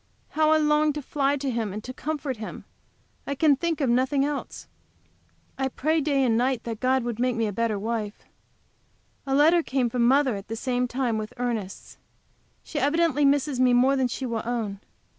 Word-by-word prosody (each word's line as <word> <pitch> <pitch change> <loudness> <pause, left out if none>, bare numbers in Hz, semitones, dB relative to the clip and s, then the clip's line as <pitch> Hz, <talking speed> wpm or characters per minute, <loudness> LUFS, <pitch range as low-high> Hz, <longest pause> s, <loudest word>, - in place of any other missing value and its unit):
How 310 0 +2
I 315 - +5
long 300 0 +2
to 295 - -4
fly 285 0 0
to 270 -1 -2
him 225 -4 -2
and 210 +2 -6
to 255 - -7
comfort 290 -3 -4
him! 215 0 -8 0.6
I 280 - -2
can 290 0 +4
think 330 +3 -2
of 275 - +2
nothing 260 +3 +2
else. 290 -1 -5 0.9
I 265 - +1
pray 310 +5 0
day 280 -2 +1
and 235 -3 +2
night 250 0 0
that 225 -2 -5
God 260 0 +1
would 235 -2 -4
make 250 0 +1
me 230 - 0
a 205 - -3
better 230 0 0
wife. 215 0 -4 1.0
A 270 - +1
letter 320 +4 +5
came 255 -5 -1
from 235 -1 +2
mother 265 -2 +3
at 195 +1 -8
the 225 - -4
same 250 +1 -1
time 240 -3 -1
with 215 0 -7
Ernest's. 230 -6 -4 0.6
She 295 - -4
evidently 295 +1 +2
misses 280 -1 +2
me 255 -1 +4
more 255 +3 +4
than 260 -2 +1
she 260 +2 -4
will 230 -3 -2
own. 225 -4 -3
255 Hz, 200 wpm, -25 LUFS, 235-285 Hz, 1.0 s, I